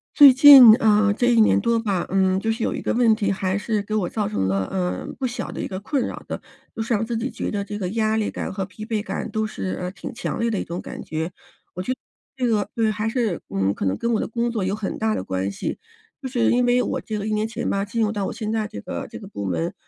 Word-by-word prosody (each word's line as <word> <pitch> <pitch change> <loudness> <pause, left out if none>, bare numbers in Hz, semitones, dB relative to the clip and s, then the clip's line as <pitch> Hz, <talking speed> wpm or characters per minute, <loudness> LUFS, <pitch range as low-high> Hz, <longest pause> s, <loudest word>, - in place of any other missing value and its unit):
最 285 -3 +10
近， 260 -4 +10
啊， 210 -1 +4
这 220 +4 0
1 230 - +5
年 215 - +4
多 235 -1 +1
吧， 200 -6 -1
嗯， 190 0 +2
就 225 +3 -1
是 225 +1 -3
有 - - -1
一 - - -5
个 - - 0
问 235 -2 +4
题 200 -2 0
还 190 0 -1
是 210 0 -1
给 215 +1 -4
我 200 -5 0
造 210 +1 -2
成 150 - -1
了， 95 0 0
呃， 180 -2 -2
不 265 - -2
小 245 -1 -4
的 - - -7
一 - - -2
个 185 - -5
困 255 +6 -1
扰 - - -6
的， - - -4 0.4
就 225 - -2
是 230 - -1
让 220 0 +1
自 230 0 -2
己 245 +4 -3
觉 - - -4
得 205 -1 -2
这 205 +1 -6
个 185 -3 -2
压 220 +1 0
力 220 -1 0
感 - - -5
和 195 - -2
疲 200 +3 -8
惫 220 -2 -1
感 - - -4
都 220 0 -1
是， 95 - -4
呃， 180 - -3
挺 190 - -8
强 235 - -4
烈 230 0 +1
的 210 - -1
一 - - -2
种 170 +1 -5
感 - - -8
觉。 160 +3 -4 0.4
我 180 - -5
觉 190 - -3
得 255 - -2 0.4
这 250 -2 0
个 210 -3 0
对， 225 -2 +2
还 215 +1 -2
是， 225 -7 -1
嗯， 95 0 0
可 - - -4
能 95 - 0
跟 235 0 -1
我 220 - +1
的 - - -2
工 235 +1 -1
作 220 -4 -2
有 190 +2 -1
很 210 -2 -4
大 220 0 +1
的 - - -3
关 95 +1 -2
系， 100 - -4 0.4
就 265 - -5
是 240 -2 +2
因 245 +1 +3
为 245 0 +3
我 - - -2
这 215 - -4
个 205 - -4
1 215 - -1
年 215 +1 0
前 225 - -4
吧， 195 - 0
进 205 +3 -4
入 210 - +1
到 205 -3 -2
我 - - -3
现 215 -1 -4
在 220 -1 -1
这 105 - -8
个 - - -5
这 - - -8
个 - - -10
部 100 - -6
门， 85 -2 -2
215 Hz, 310 characters per minute, -23 LUFS, 190-230 Hz, 0.4 s, 最